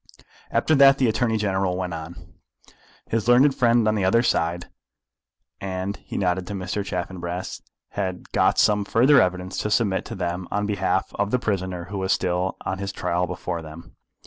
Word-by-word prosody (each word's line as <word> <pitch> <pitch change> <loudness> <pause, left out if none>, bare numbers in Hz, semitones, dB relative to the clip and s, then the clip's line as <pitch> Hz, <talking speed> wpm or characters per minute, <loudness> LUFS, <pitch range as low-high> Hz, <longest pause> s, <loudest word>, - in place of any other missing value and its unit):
After 155 - +1
that 140 -1 +7
the 130 - +2
Attorney 110 0 +1
General 95 -3 0
went 90 -2 -3
on. 80 +1 -7 0.9
His 115 -1 -1
learned 130 +4 +6
friend 120 -3 +3
on 110 - +3
the 105 -3 0
other 115 +6 +3
side, 85 -5 0 0.9
and 95 +1 -4
he - - -8
nodded 90 -1 0
to 100 - -5
Mr. 95 +2 -3
Chaffanbrass, 90 -1 -5 0.3
had 95 -3 -4
got - - +2
some 105 -1 +3
further 130 +8 +5
evidence 90 0 -1
to 105 - -2
submit 105 -3 +1
to 115 - -7
them 90 -1 -3
on 105 +1 -1
behalf 95 -2 0
of 100 0 +1
the 125 - +2
prisoner 95 -6 -2
who 100 - -3
was 95 0 -1
still 90 0 0
on 95 +1 -3
his 100 0 -3
trial 90 -2 -1
before 85 -2 -4
them. 80 +2 -12
95 Hz, 175 wpm, -24 LUFS, 90-105 Hz, 0.9 s, that